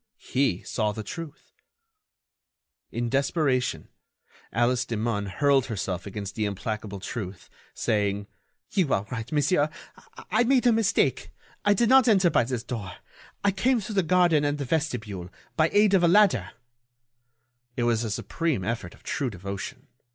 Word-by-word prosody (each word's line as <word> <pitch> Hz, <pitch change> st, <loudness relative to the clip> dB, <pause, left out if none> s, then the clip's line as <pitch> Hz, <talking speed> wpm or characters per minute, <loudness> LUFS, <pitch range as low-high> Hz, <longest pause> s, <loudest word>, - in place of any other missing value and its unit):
He 125 Hz, -9 st, 0 dB
saw 105 Hz, -2 st, -1 dB
the 110 Hz, -, -5 dB
truth! 160 Hz, +7 st, -8 dB, 1.4 s
In 120 Hz, 0 st, -2 dB
desperation, 135 Hz, 0 st, 0 dB, 0.6 s
Alice 120 Hz, +2 st, +2 dB
Demun 110 Hz, -2 st, -2 dB
hurled 140 Hz, +6 st, +2 dB
herself 95 Hz, -3 st, -3 dB
against 100 Hz, 0 st, -5 dB
the 110 Hz, -, -1 dB
implacable 105 Hz, 0 st, -4 dB
truth, 95 Hz, -2 st, -6 dB, 0.2 s
saying: 100 Hz, -2 st, 0 dB, 0.5 s
"You 180 Hz, -8 st, +1 dB
are 100 Hz, -, -2 dB
right, 115 Hz, -2 st, -5 dB
monsieur. 150 Hz, +1 st, +2 dB, 0.6 s
I 220 Hz, +3 st, +4 dB
made 255 Hz, 0 st, +3 dB
a 240 Hz, -, +6 dB
mistake. 225 Hz, -3 st, +1 dB, 0.3 s
I 205 Hz, 0 st, +4 dB
did 235 Hz, +4 st, +3 dB
not 265 Hz, -1 st, +6 dB
enter 190 Hz, -6 st, +4 dB
by -, -, +3 dB
this 125 Hz, -2 st, -3 dB
door. 110 Hz, -6 st, -5 dB, 0.5 s
I 200 Hz, -, +4 dB
came 235 Hz, +6 st, +2 dB
through 215 Hz, +1 st, -6 dB
the 195 Hz, -, +3 dB
garden 175 Hz, -3 st, +3 dB
and 145 Hz, 0 st, 0 dB
the 140 Hz, -, -3 dB
vestibule... 120 Hz, -, -2 dB, 0.3 s
by 160 Hz, 0 st, +3 dB
aid 205 Hz, -1 st, +4 dB
of 190 Hz, -, +5 dB
a 175 Hz, -, +5 dB
ladder—" 170 Hz, -, +4 dB, 1.3 s
It 120 Hz, -, +1 dB
was 120 Hz, -1 st, +2 dB
a 115 Hz, -, -2 dB
supreme 145 Hz, -, -1 dB
effort 110 Hz, -4 st, -4 dB
of -, -, -24 dB
true 135 Hz, -3 st, -2 dB
devotion. 100 Hz, -1 st, -7 dB
125 Hz, 150 wpm, -26 LUFS, 105-170 Hz, 1.4 s, a